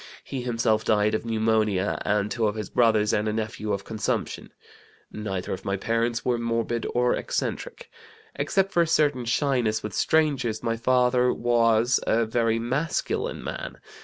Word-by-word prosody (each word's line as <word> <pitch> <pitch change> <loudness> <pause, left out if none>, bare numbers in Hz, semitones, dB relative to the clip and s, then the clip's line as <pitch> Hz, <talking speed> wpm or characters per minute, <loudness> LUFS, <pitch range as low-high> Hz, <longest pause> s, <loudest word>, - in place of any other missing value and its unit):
He 135 - -5
himself 115 -3 +1
died 105 0 +2
of 110 - -2
pneumonia, 110 -3 +1
and 105 0 0
two 115 -2 +1
of 105 - -2
his 105 -3 -5
brothers 110 -3 +3
and 105 +1 +1
a 105 - 0
nephew 110 -1 -3
of 100 0 -2
consumption. 110 -1 -3 0.6
Neither 95 -4 -4
of 95 - -6
my 95 0 -1
parents 115 +3 -1
were 120 -2 +1
morbid 115 0 -1
or 125 0 +3
eccentric. - - -3 0.5
Excepting 195 0 0
for 170 - +3
a 170 - +2
certain 145 -6 +2
shyness 120 -4 +1
with 105 -2 -5
strangers, 135 -8 +1
my 115 0 0
father 125 +1 +2
was 115 0 +2
a 115 +1 +3
very 115 0 +1
masculine 130 +8 -2
man. - - -6
115 Hz, 160 wpm, -25 LUFS, 110-125 Hz, 0.6 s, brothers